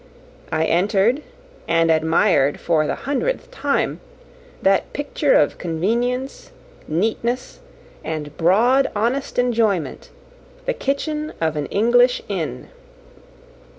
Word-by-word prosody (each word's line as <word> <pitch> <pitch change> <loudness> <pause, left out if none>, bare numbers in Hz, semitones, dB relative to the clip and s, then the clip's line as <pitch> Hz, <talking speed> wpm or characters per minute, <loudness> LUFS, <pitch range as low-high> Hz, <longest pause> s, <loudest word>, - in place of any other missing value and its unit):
I 160 0 +1
entered, 200 - +2 0.5
and 165 0 +3
admired, 160 -2 +2
for 155 -3 +1
the - - -1
hundredth 455 - -2
time, - - -1 0.6
that 195 0 +2
picture 290 +11 +1
of - - +2
convenience, 235 +10 -2 0.4
neatness, 225 +9 -2 0.4
and 150 -2 -5
broad, 235 +11 +3
honest 240 +6 -1
enjoyment, 220 - 0 0.6
the - - 0
kitchen 305 - -2
of 160 -1 0
an 150 -1 -2
English 245 +4 +3
inn. 180 -7 -4
210 Hz, 100 wpm, -21 LUFS, 165-250 Hz, 0.6 s, and